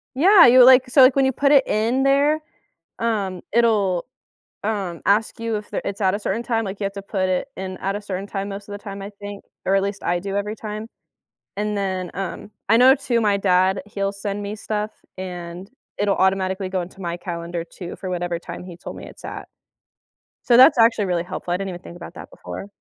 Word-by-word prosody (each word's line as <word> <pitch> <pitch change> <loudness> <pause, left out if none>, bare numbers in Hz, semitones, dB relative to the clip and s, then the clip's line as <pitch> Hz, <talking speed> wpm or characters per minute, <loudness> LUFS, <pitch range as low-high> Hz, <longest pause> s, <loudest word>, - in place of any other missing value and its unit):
Yeah, 360 +6 +7
you 250 +1 +8
like, 255 0 +7
so, 265 +2 +6
like, 255 0 +7
when 270 - +4
you 265 - +2
put 280 +3 +2
it 275 -2 +6
in 230 +5 +1
there, 285 +3 +3 0.6
um, 200 -6 -1
it'll, 210 -6 +2 0.6
um, 195 -6 -3
ask 215 +3 +2
you 230 -1 -2
if 210 - -9
there - - -2
it's 200 +1 -4
at 190 -1 +3
a - - -4
certain 215 +2 -2
time, 230 -2 0
like, 195 0 -6
you - - -3
have 195 - -3
to 200 - -6
put 195 -1 -2
it 185 +8 0
in 185 -1 -5
at 195 +1 -2
a 205 - -4
certain 195 -1 -5
time 200 0 -4
most 200 0 -7
of - - -6
the 205 - -5
time, 200 -1 -7
I 200 - -6
think, 205 0 -8 0.2
or 195 - +3
at 195 - +2
least 200 0 -4
I 175 0 0
do 195 +1 -5
every 210 +1 -2
time. 215 0 -6 0.7
And 210 0 -1
then, 185 -3 -2
um, 195 +2 -5 0.2
I 225 - +6
know, 260 +2 +7
too, 240 -5 0
my 205 -2 +2
dad, 190 0 +2
he'll 200 -1 -2
send 200 0 -4
me 205 +1 -4
stuff, 215 0 -3 0.3
and 180 +1 -7 0.3
it'll 205 -1 +1
automatically 190 0 +1
go 185 -1 -1
into 185 +2 -10
my 170 -1 -3
calendar 170 -1 -5
too, 175 0 -9
for 185 - -6
whatever 175 -1 -2
time 170 0 -8
he 180 -2 -10
told 175 - -8
me - - -9
it's - - -13
at. - - -7 1.0
So, 240 - +4
that's 255 0 +8
actually 225 -3 +4
really 175 -2 0
helpful, 180 -1 -5
I - - +2
didn't 195 +1 -4
even 175 -1 -8
think 170 - -11
about 175 - -10
that - - -10
before. - - -8
200 Hz, 230 wpm, -22 LUFS, 185-220 Hz, 1.0 s, you